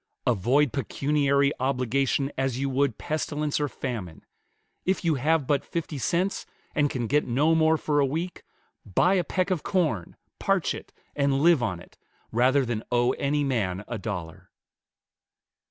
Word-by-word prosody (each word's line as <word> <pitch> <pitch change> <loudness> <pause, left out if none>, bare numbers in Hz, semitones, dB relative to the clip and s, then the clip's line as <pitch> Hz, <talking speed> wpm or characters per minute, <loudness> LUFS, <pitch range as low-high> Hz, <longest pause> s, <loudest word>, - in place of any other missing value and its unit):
Avoid 125 +4 +2
pecuniary 140 +2 +1
obligation 135 +1 0
as 135 -2 -1
you 135 0 -1
would 135 -3 +1
pestilence 150 -1 -2
or 145 - +1
famine. 110 - -6 0.6
If 190 -1 0
you 165 - +3
have 155 0 +2
but 140 0 +1
fifty 160 -4 -4
cents, 180 - -1 0.3
and 145 -1 +2
can 125 -3 -2
get 145 +6 +1
no 145 +7 +3
more 160 0 +4
for 150 -1 0
a 140 - +4
week, 165 +6 -3 0.4
buy 170 - +2
a 185 -2 +2
peck 185 +3 -1
of 180 -5 0
corn, 160 - -1 0.2
parch - - +1
it, - - -9 0.2
and 140 -1 +1
live 170 -5 +5
on 95 -7 -1
it, - - -17 0.3
rather 130 +4 +3
than 115 -2 -2
owe 120 +1 +3
any 145 +2 0
man 105 -8 -1
a 120 - -4
dollar." 90 -6 -6
140 Hz, 155 wpm, -26 LUFS, 120-150 Hz, 0.6 s, live